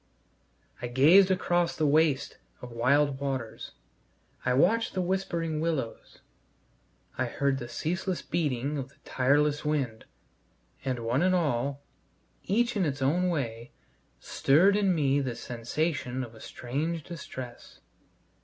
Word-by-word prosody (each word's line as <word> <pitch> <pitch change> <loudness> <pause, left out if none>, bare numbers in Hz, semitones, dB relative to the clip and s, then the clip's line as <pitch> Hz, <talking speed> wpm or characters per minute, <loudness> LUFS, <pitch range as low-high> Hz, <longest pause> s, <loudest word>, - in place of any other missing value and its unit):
I 120 - -2
gazed 155 +11 +6
across 175 -2 +1
the 155 - 0
waste 150 -1 +2 0.2
of 125 - -9
wild 135 +4 +2
waters; 135 -5 -4 0.7
I 125 - +1
watched 220 - +2
the - - 0
whispering 170 -4 -1
willows; 155 -9 -3 1.0
I 130 - +2
heard 135 +2 0
the 120 - -6
ceaseless 180 +8 -2
beating 145 -2 -1
of 135 -1 -5
the - - -24
tireless 145 +3 +2
wind; 140 -7 -2 0.8
and, 130 -3 -2
one 120 +5 +1
and 185 +1 +3
all, 140 -4 0 0.6
each 235 +5 +1
in 200 - +1
its 140 -4 -1
own 175 +7 +2
way, 120 -7 -3 0.5
stirred 175 +9 +3
in 200 -3 +2
me 140 -3 +2
this 130 -4 -3
sensation 130 +2 -2
of 120 -2 -9
a 110 - -14
strange 155 +6 -3
distress. 130 -7 -9
145 Hz, 130 wpm, -28 LUFS, 130-170 Hz, 1.0 s, gazed